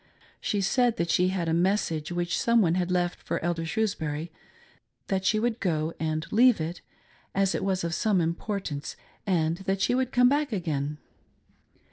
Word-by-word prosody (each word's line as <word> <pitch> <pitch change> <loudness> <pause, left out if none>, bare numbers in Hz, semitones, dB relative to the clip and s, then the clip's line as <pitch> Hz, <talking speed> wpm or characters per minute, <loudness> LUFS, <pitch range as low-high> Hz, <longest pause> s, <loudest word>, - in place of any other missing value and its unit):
She 205 - -1
said 240 +4 +2
that 170 -1 0
she 180 - +3
had 185 -3 -1
a 160 - +1
message 170 -3 0
which 175 0 -1
some 235 0 +4
one 170 -6 +3
had 180 0 0
left 180 -1 0
for - - -2
Elder 165 -1 -1
Shrewsbury; 160 -5 -2 0.8
that 190 -1 0
she 215 +1 +3
would 235 0 -1
go 160 -4 -1
and 155 0 -1
leave 240 0 +5
it, 165 +3 -4 0.5
as 195 -1 +2
it - - -2
was 190 -2 0
of 170 0 -2
some 205 0 +2
importance, 170 -2 -3 0.3
and 165 -3 +1
that 195 0 -2
she 245 - +2
would 255 0 0
come 250 0 +5
back 285 +1 +1
again. 150 -7 -2
180 Hz, 175 wpm, -27 LUFS, 165-210 Hz, 0.8 s, leave